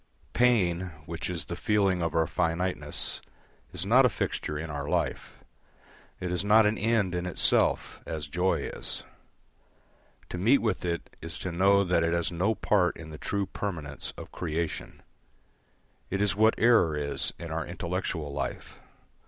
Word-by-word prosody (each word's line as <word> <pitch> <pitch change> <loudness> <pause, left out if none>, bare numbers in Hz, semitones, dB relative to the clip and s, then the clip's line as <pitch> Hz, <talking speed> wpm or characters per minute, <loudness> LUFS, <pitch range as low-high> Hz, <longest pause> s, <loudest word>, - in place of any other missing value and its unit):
Pain, 95 -8 +3 0.2
which 85 0 -5
is 85 -3 -2
the 85 - -5
feeling 95 -1 +2
of 85 -1 -1
our 80 0 +3
finiteness, 80 -3 -1 0.5
is 85 - -4
not 125 +6 +6
a 125 - +5
fixture 75 -7 -3
in 80 +1 -5
our 70 0 -4
life. - - -2 0.8
It 90 -1 -3
is 90 +1 0
not 105 +2 +6
an 105 +1 +2
end 110 -4 +1
in 90 0 -2
itself, 90 - +2
as 80 -2 -4
joy 90 +5 +1
is. - - -5 1.3
To 90 - -5
meet 120 +9 +5
with 115 -4 -1
it 85 -1 -3
is 85 0 -5
to 90 - -4
know 100 +3 +4
that 90 -3 +2
it 85 0 +1
has 85 0 0
no 95 +6 +1
part 95 -3 +2
in 80 -1 -9
the 75 - -9
true 100 -1 -1
permanence 80 -9 -4
of - - -9
creation. 80 -1 -4 1.1
It 95 - -1
is 105 -1 +2
what 110 +2 +4
error 110 -10 +4
is 70 -1 -1
in 85 -2 -7
our 80 0 -1
intellectual 85 -3 -3
life. 70 -3 -5
90 Hz, 160 wpm, -28 LUFS, 80-100 Hz, 1.3 s, not